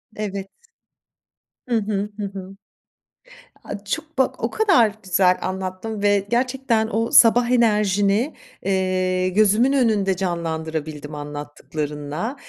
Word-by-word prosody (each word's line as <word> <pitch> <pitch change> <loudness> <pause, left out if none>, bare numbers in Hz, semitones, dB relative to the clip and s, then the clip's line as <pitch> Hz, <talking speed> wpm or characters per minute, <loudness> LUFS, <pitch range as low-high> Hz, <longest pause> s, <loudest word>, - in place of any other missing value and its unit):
Evet. 200 -2 -4 1.2
Hı 240 - +2
hı. 210 -1 -2
Hı 210 - -2
hı. 195 0 -9 1.1
A, 200 - -7
çok 315 +8 -5
bak 265 - 0
o - - +1
kadar 335 - +3
güzel 185 0 +3
anlattın 190 +3 -4
ve 205 0 +3
gerçekten 245 -2 +1
o 225 +1 -1
sabah 235 +1 +6
enerjini, 210 +1 +2 0.3
eee, 185 -1 0
gözümün 215 +7 +3
önünde 210 -7 +2
canlandırabildim 160 -4 -4
anlattıklarınla. 150 - -5
200 Hz, 105 wpm, -22 LUFS, 185-225 Hz, 1.2 s, sabah